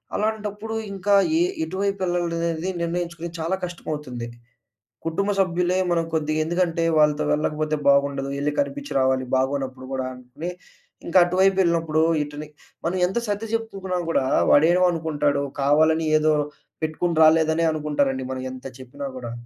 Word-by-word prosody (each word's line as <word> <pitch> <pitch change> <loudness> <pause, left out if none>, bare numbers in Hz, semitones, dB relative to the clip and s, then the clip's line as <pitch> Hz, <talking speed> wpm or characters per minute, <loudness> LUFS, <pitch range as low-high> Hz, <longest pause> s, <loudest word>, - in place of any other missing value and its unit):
అలాంటప్పుడు 215 0 -2 0.2
ఇంకా 195 +1 0 0.2
యే 335 - +4 0.2
ఎటువైపెళ్ళాలనేది 175 - -1
నిర్ణయించుకొని 170 0 -3
చాలా 165 +4 0
కష్టమవుతుంది. 150 -8 -6 0.8
కుటుంబ 195 +5 0
సభ్యులే 180 0 +1
మనకు 165 -1 0
కొద్దిగా 155 0 0
ఎందుకంటే 170 0 0
వాళ్ళతో 150 -1 +3
వెళ్ళకపోతే 155 +1 -1
బాగుండదు. 140 -1 +2
యెళ్లి 145 +1 0
కనిపించి 280 0 -2
రావాలి. 130 0 +2
బాగోనప్పుడు 130 -1 -2
గూడా 130 -1 -2
అని 125 +7 -7 0.6
ఇంకా - - +3
అటు 175 +1 -2
వైపెళ్ళినప్పుడు 170 -5 +3 0.2
ఇటుని 150 +1 -8 0.4
మనం 175 +3 0
ఎంత 190 +6 -1
సర్ది 205 +2 -2
జెప్పుకున్నా 195 -5 -2
కూడా 135 - +1 0.3
వాడేమనుకుంటాడు 160 -3 +3 0.2
కావాలని 155 +3 +3
ఏదో 155 0 +3 0.5
పెట్టుకొని 160 +2 -1
రాలేదనే 160 +1 +4
అనుకుంటారండి 145 -4 -1
మనం 130 0 -4
ఎంత 130 0 -10
చెప్పినా 130 +2 -8
గూడా. 120 -2 -6
160 Hz, 125 wpm, -23 LUFS, 145-180 Hz, 0.8 s, యే